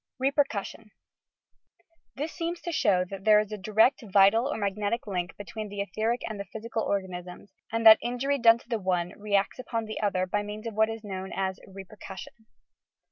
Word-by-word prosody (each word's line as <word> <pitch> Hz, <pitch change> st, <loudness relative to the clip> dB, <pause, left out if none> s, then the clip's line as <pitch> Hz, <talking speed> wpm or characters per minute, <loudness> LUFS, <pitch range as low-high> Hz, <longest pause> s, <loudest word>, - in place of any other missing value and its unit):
"bbpehcussion" 260 Hz, -6 st, -1 dB, 1.3 s
This 300 Hz, +4 st, -3 dB
seems 340 Hz, +1 st, -4 dB
to 345 Hz, -, -4 dB
show 200 Hz, -, +2 dB
that 195 Hz, +1 st, -8 dB
there 215 Hz, 0 st, +6 dB
is 210 Hz, 0 st, -3 dB
a 210 Hz, -, -4 dB
direct 220 Hz, +7 st, +3 dB
vital 205 Hz, +4 st, +4 dB
or -, -, -2 dB
mag 200 Hz, -2 st, -1 dB
netic 210 Hz, +3 st, -2 dB
link 180 Hz, -3 st, -4 dB
between 210 Hz, +1 st, -7 dB
the 200 Hz, 0 st, -7 dB
etheric 220 Hz, +4 st, -1 dB
and 215 Hz, -2 st, -6 dB
the 200 Hz, -, -4 dB
physical 225 Hz, +1 st, -4 dB
organ 190 Hz, -3 st, -1 dB
isms, 180 Hz, +2 st, -9 dB, 0.2 s
and 230 Hz, 0 st, -1 dB
that 220 Hz, 0 st, +10 dB
injury 255 Hz, +4 st, -1 dB
done 230 Hz, -1 st, +7 dB
to 235 Hz, -, -19 dB
the 230 Hz, -3 st, -1 dB
one 180 Hz, -2 st, 0 dB
re 205 Hz, -1 st, -2 dB
acts 200 Hz, +5 st, +1 dB
upon 230 Hz, -3 st, -3 dB
the 215 Hz, -, -5 dB
other 185 Hz, -3 st, +1 dB
by 205 Hz, +3 st, -1 dB
means 210 Hz, +2 st, -7 dB
of 230 Hz, -, -4 dB
what 220 Hz, +1 st, +3 dB
is 225 Hz, 0 st, -6 dB
known 190 Hz, -2 st, -6 dB
as 190 Hz, -1 st, -2 dB
"repercussion." 195 Hz, 0 st, -10 dB
215 Hz, 195 wpm, -28 LUFS, 195-230 Hz, 1.3 s, that